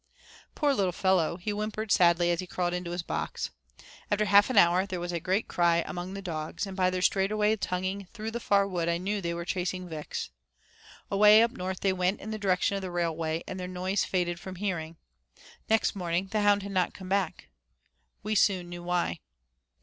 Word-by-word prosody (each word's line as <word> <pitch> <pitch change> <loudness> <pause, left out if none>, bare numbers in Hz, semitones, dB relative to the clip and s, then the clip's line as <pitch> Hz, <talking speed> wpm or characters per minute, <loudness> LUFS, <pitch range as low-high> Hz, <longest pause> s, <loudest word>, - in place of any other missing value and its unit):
Poor 290 -2 +2
little 195 -7 +1
fellow, 185 -3 +1
he 190 +4 -3
whimpered 215 +1 -3
sadly 175 0 +4
as 170 - 0
he 185 - -4
crawled 175 0 -1
into 180 -1 -3
his 175 0 -3
box. - - -3 0.6
After 210 0 +2
half 205 +2 +6
an 255 - -1
hour 180 +1 +5
there 185 -2 -4
was 175 0 -3
a 170 - -2
great 190 +5 0
out - - -35
cry 170 -1 +3
among 180 +1 -5
the 195 - -6
dogs, 160 +2 -4
and 195 -1 -7
by 185 -1 +2
their 185 0 -2
straight 190 +1 +2
away 215 0 +2
tonguing 190 0 -3
through 220 0 -5
the 235 - -3
far 200 -3 +2
wood 175 -3 -1
I 170 - +1
knew 200 +3 -2
they 170 -1 -2
were 170 0 -5
chasing 185 0 -2
Vix. 155 - -5 0.8
Away 210 +2 +7
up 230 - +1
north 185 -6 -5
they 195 -1 +2
went 185 +2 0
in 220 - -7
the 215 - -4
direction 195 0 +1
of 195 - -2
the 185 - -4
railway 165 -2 -1
and 185 - -5
their 180 - -4
noise 185 +2 -1
faded 175 -2 -1
from 190 0 -8
hearing. 170 -4 -3 0.7
Next 220 -1 +2
morning 180 0 -1
the 215 - +1
hound 205 -1 +3
had 200 - -6
not 185 -2 0
come 190 - -9
back. 195 0 -1 0.7
We 215 +1 -1
soon 185 -4 +2
knew 175 0 -7
why. 175 - -1
185 Hz, 210 wpm, -28 LUFS, 175-200 Hz, 0.8 s, Away